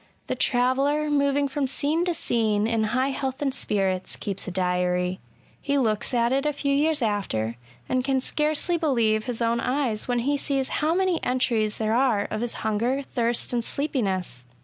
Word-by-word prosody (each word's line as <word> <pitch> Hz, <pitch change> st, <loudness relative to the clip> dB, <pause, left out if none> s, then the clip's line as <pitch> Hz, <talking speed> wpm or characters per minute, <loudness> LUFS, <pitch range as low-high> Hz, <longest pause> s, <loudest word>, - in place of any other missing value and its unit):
The -, -, -2 dB
traveller, 275 Hz, +4 st, +1 dB
moving 280 Hz, 0 st, +2 dB
from 275 Hz, 0 st, -1 dB
scene 300 Hz, +5 st, +1 dB
to 350 Hz, -2 st, 0 dB
scene 220 Hz, -9 st, +1 dB
in 225 Hz, -1 st, +1 dB
high 255 Hz, +5 st, +1 dB
health 265 Hz, 0 st, -3 dB
and 275 Hz, -2 st, -1 dB
spirits, 190 Hz, -6 st, -1 dB
keeps 195 Hz, -2 st, -3 dB
a -, -, -3 dB
diary; 180 Hz, 0 st, 0 dB, 0.4 s
he 280 Hz, 0 st, 0 dB
looks 220 Hz, -6 st, +1 dB
at 235 Hz, -1 st, +2 dB
it 270 Hz, +1 st, +1 dB
a 295 Hz, -, 0 dB
few 280 Hz, 0 st, -1 dB
years 300 Hz, 0 st, +2 dB
after, 115 Hz, -, -1 dB, 0.3 s
and 255 Hz, 0 st, 0 dB
can 270 Hz, 0 st, +1 dB
scarcely 305 Hz, +5 st, 0 dB
believe 230 Hz, -8 st, +1 dB
his 240 Hz, -2 st, -1 dB
own 230 Hz, +1 st, +1 dB
eyes 250 Hz, -4 st, -1 dB
when 245 Hz, -1 st, 0 dB
he 285 Hz, +1 st, +2 dB
sees 275 Hz, -2 st, -1 dB
how 315 Hz, +2 st, +2 dB
many 370 Hz, -2 st, +1 dB
entries 230 Hz, -4 st, +1 dB
there 220 Hz, 0 st, 0 dB
are 235 Hz, -5 st, +2 dB
of 215 Hz, -, -2 dB
his* 240 Hz, -1 st, -2 dB
hunger, 235 Hz, +6 st, 0 dB
thirst, 240 Hz, -2 st, -1 dB
and 240 Hz, -1 st, 0 dB
sleepiness. 190 Hz, -, -2 dB
250 Hz, 180 wpm, -25 LUFS, 215-280 Hz, 0.4 s, moving